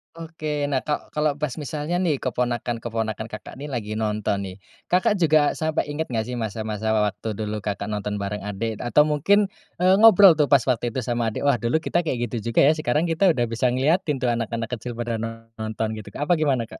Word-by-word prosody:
Oke 155 -3 -4
nah 135 - +2
ka 150 +2 -4
kalau 150 -1 0
pas 150 -1 -2
misalnya 155 +3 -2
nih 170 -5 +1
keponakan-keponakan 115 -3 -2
Kakak 110 +3 -9
nih 145 - -6
lagi 110 -5 -4
nonton 105 -2 -1
nih, 90 - -8 0.3
Kakak 185 +3 +2
juga 155 -3 +4
sampai 155 -2 -1
inget 160 +2 -3
gak 115 -3 -1
sih 125 +1 -5
masa-masa 110 -1 -3
waktu 105 +1 -1
dulu 105 0 -3
Kakak 100 0 -4
nonton 105 0 -3
bareng 100 +1 -3
adik 105 +2 -3
atau 120 +5 +4
mungkin, 195 +7 +2 0.2
eee, 185 +1 +4
ngobrol 205 -4 +9
tuh 150 - +4
pas 135 -2 +4
waktu 120 -2 0
itu 130 - -1
sama 120 -1 -1
adik, 110 - -3
"Wah 140 -4 +3
dulu 125 +8 0
kita 175 - +1
kayak 125 -9 -2
gitu 115 -2 -4
juga - - +4
ya, 140 - +6
sekarang 155 -1 0
kita 165 +4 +3
udah 120 - +1
bisa 115 +2 0
ngeliatin 150 +6 +1
tuh 125 -2 0
anak-anak 115 0 -3
kecil 120 +1 -6
pada 115 -1 -3
nonton," 115 -1 -5
gitu 105 - -11
Kak - - -2
apa - - +8
gimana 135 -6 +1
Kak? 115 - -11
120 Hz, 205 wpm, -23 LUFS, 110-150 Hz, 0.3 s, ngobrol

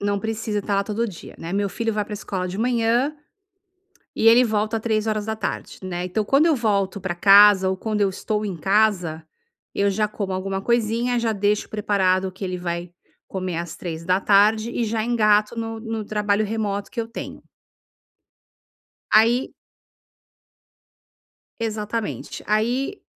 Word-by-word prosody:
Não 200 0 0
precisa 215 0 -2
estar 200 0 -1
lá 200 - +1
todo 220 +3 -1
dia, 185 -6 -10
né. 165 +2 -6
Meu 200 0 0
filho 225 +4 -2
vai 210 -1 -1
pra 210 +1 -7
escola 185 -3 -4
de 185 - -5
manhã 240 +4 +1 1.0
e 225 - +2
ele 235 +2 +7
volta 215 0 0
15h, 215 -1 -2
né. 180 -1 -3
Então, 185 +4 -1
quando 275 +7 +4
eu 320 - +3
volto 200 -5 0
pra 185 -2 -3
casa, 195 +1 +7
ou 190 - -1
quando 215 0 -2
eu 200 - +3
estou 210 +2 -3
em 195 -3 -3
casa, 190 -3 +1 0.5
eu 200 0 +2
já 210 +2 0
como 200 -3 -4
alguma 195 +1 -3
coisinha, 235 +2 +1
já 230 -1 0
deixo 205 +1 0
preparado 195 -3 +1
o - - -6
que 190 +2 -10
ele 185 -1 -3
vai 175 0 -4 0.4
comer 185 -3 -4
às 170 0 -5
15h 195 +6 +2
e 240 - -1
já 220 0 -1
engato 215 -2 +2
no 225 0 -4
no 225 -1 -4
trabalho 210 0 0
remoto 205 -2 -3
que - - -5
eu 225 - -6
tenho. 230 - -8 1.7
Aí 230 +4 +4 2.1
Exatamente. 220 0 -4
Aí 245 - 0
210 Hz, 155 wpm, -23 LUFS, 195-225 Hz, 2.1 s, ele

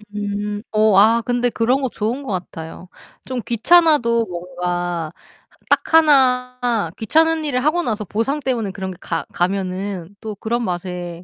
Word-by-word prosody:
음 205 0 -3
어 215 -1 +3
아 225 +3 +5
근데 245 0 +1
그런 245 +4 +1
거 260 - -1
좋은 235 +7 -3
것 260 - -5
같아요. 175 -1 -6 0.4
좀 255 -1 -4
귀찮아도 240 -3 +4
뭔가 175 -2 -3 0.6
딱 - - +1
하나 250 - +3
귀찮은 320 +7 +2
일을 255 -4 0
하고 310 +4 +2
나서 215 -6 -2
보상 230 - -1
때문에 240 -8 -2
그런 190 -1 -5
게 180 - -11
가 165 -1 -3
가면은 190 0 -2
또 215 -2 -6
그런 235 +4 -2
맛에 175 -2 -5
220 Hz, 265 characters per minute, -20 LUFS, 185-250 Hz, 0.6 s, 아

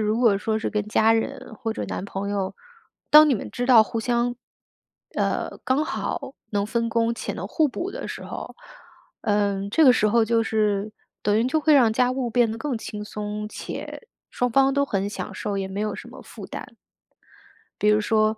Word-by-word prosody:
如 215 +1 +1
果 225 -5 +4
说 220 +1 -1
是 220 - -3
跟 210 -1 0
家 220 +1 +4
人 225 0 -2
或 225 +1 -3
者 - - -4
男 - - -4
朋 200 0 -4
友， 195 -2 -2 0.6
当 305 +1 +9
你 275 - +3
们 - - -5
知 245 -1 -3
道 245 -4 +8
互 225 +1 -3
相 240 +1 0 0.8
呃， - - -1
刚 275 +4 +2
好 275 -4 -4 0.2
能 205 -1 0
分 230 +1 -1
工 230 0 +1
且 - - -4
能 - - -5
互 315 -3 +2
补 350 +8 -4
的 - - -6
时 - - -7
候， - - -7 0.6
嗯， 200 -1 0
这 310 +8 +4
个 255 - +8
时 215 -3 +2
候 230 +1 +4
就 230 0 +2
是 215 -2 0 0.3
等 210 +1 +2
于 225 - +2
就 290 +5 +1
会 305 0 +4
让 240 -5 +5
家 250 +2 +2
务 255 -1 -2
变 240 -1 +3
得 225 - -5
更 270 0 -2
轻 210 -1 -6
松 210 0 -5
且 470 - -7 0.2
双 245 0 0
方 270 +3 +4
都 280 0 +3
很 200 -6 -1
享 205 - -6
受， 205 -1 -3
也 190 -1 -3
没 195 +2 -4
有 215 0 -1
什 - - -9
么 - - -11
负 - - -11
担。 - - -7 1.1
比 210 - 0
如 210 0 +4
说 215 0 +2
225 Hz, 220 characters per minute, -24 LUFS, 210-245 Hz, 1.1 s, 当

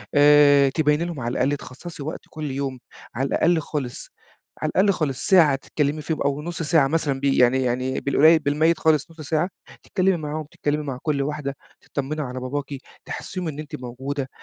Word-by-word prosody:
آآ 145 -1 +6
تبيّني 150 +3 +1
لهم 170 -4 -5
على 120 -1 -2
الأقل 140 +3 +1
تخصّصي 145 +4 -9
وقت 155 +4 -5
كل 155 -2 -5
يوم 135 -1 -3 0.4
على 135 +4 0
الأقل 170 +4 +2
خالص 145 -5 -5 0.5
على 155 - 0
الأقل 200 +2 +4
خالص 150 -8 -2
ساعة 165 -7 +6
تتكلِّمي 145 +2 -2
فيهم 155 +1 -3
أو 140 +1 0
نُص 170 +2 -5
ساعة 155 -3 +3
مثلًا 145 -2 0
بي 140 0 +1
يعني 125 +1 +4
يعني 130 +2 -1
بالقليّل 155 +4 +5
بالمَيِّت 155 +3 +2
خالص 155 -1 +2
نُص 165 -1 -12
ساعة، 155 +4 0 0.3
تتكلِّمي 190 -1 +1
معاهم، 155 0 -4
تتكلِّمي 150 +1 -1
مع 135 -3 -4
كل 150 -3 0
واحدة، 140 -1 -3 0.3
تطمّني 150 +2 -4
على 130 -2 -4
باباكِ، 135 +3 -3 0.4
تحسِّسيهم 180 -2 -5
إن 150 -2 -5
أنتِ 155 - -6
موجودة، 130 +2 -4
145 Hz, 180 wpm, -23 LUFS, 135-155 Hz, 0.5 s, آآ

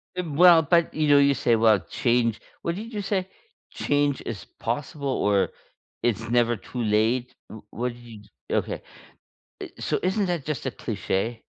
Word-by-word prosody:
Ev 180 -4 -3
well 170 +2 +7
but, 170 +2 +2
you 155 -1 0
know, 145 -1 +6
you 140 0 +5
say, 120 -2 +2
"Well, 110 -2 +4
change" 115 +1 0 0.2
What 170 - -2
did 225 +4 -7
you 205 - -2
say? 190 -2 -1 0.4
"Change 145 -1 0
is 110 -3 -5
possible?" 140 +4 -3
Or, 105 -7 +2 0.5
"It's 115 -1 0
never 120 0 +3
too 120 +3 -6
late?" 110 +4 +1 0.2
W 110 - -10
what 120 +1 -3
did 115 -3 -14 0.2
y - - +1
okay. - - -3 0.8
Eh - - -6
so, - - 0
isn't 190 +3 +1
that 175 -6 -2
just 150 -3 -4
a 130 - -1
cliche? 110 +1 -3
125 Hz, 170 wpm, -25 LUFS, 115-155 Hz, 0.8 s, well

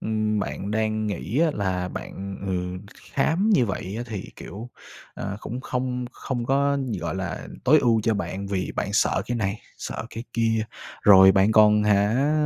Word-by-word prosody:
ừm, 110 -1 0
bạn 100 0 -4
đang 110 0 0
nghĩ 105 +5 -2
á 165 -1 +4
là 95 -3 -1
bạn, 95 +1 -6
ừ, 95 - -1 0.4
kh - - -18
khám 165 +10 +2
như 130 - +4
vậy 95 -1 -4
á - - -2
thì, 105 -5 -5
kiểu, 105 +7 -8 0.5
ờ, 100 0 -4
cũng 125 +4 -5
không 125 -1 -2
không 120 -3 -4
có, 140 +1 +2
nh 130 -4 -3
gọi 85 0 -3
là, 95 -4 -4 0.2
tối 150 +4 +6
ưu 115 -4 +3
cho 110 +1 +1
bạn 100 -1 -4
vì 95 -2 -2
bạn 100 - -2
sợ 105 - +2
cái 120 - -2
này, 105 -2 -2 0.2
sợ - - -5
cái 115 +2 -7
kia, 115 -1 +1 0.4
rồi 95 -2 +8
bạn 95 +3 +4
còn, 105 -1 +6
hả, 105 +8 +3
110 Hz, 190 wpm, -24 LUFS, 100-125 Hz, 0.5 s, rồi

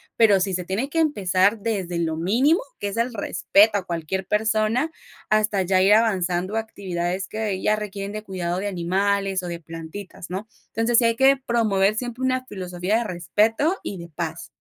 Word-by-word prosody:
pero 210 -4 +5
sí 190 0 0
se 180 0 -1
tiene 210 +10 -2
que 330 - -1
empezar 205 - +2
desde 190 -6 -2
lo 160 -1 -1
mínimo, 250 - +2 0.2
que 205 - -2
es 200 - -4
el 235 +1 0
respeto 205 +1 +3
a 190 - -3
cualquier 175 +2 -3
persona, 220 +8 +1 0.4
hasta 215 -2 +2
ya 185 +1 +2
ir 200 +2 +6
avanzando 190 -3 +1
a - - +2
actividades 185 -3 -4
que 210 -3 -3
ya 215 - +2
requieren 205 -1 -5
de 215 0 -5
cuidado 180 -2 -3
de 205 - -2
animales 195 +1 0
o - - -4
de 170 -1 -5
plantitas, 165 +3 -9
¿no? 195 +4 -5 0.2
Entonces, 230 +1 +1
sí - - +2
hay 230 0 +2
que 270 +1 +6
promover 215 -6 +1
siempre 245 +2 -4
una 255 0 0
filosofía 185 0 -2
de - - -1
respeto 220 - +1
y 195 - -5
de 170 0 -8
paz. 160 0 -5
200 Hz, 190 wpm, -23 LUFS, 180-225 Hz, 0.4 s, ir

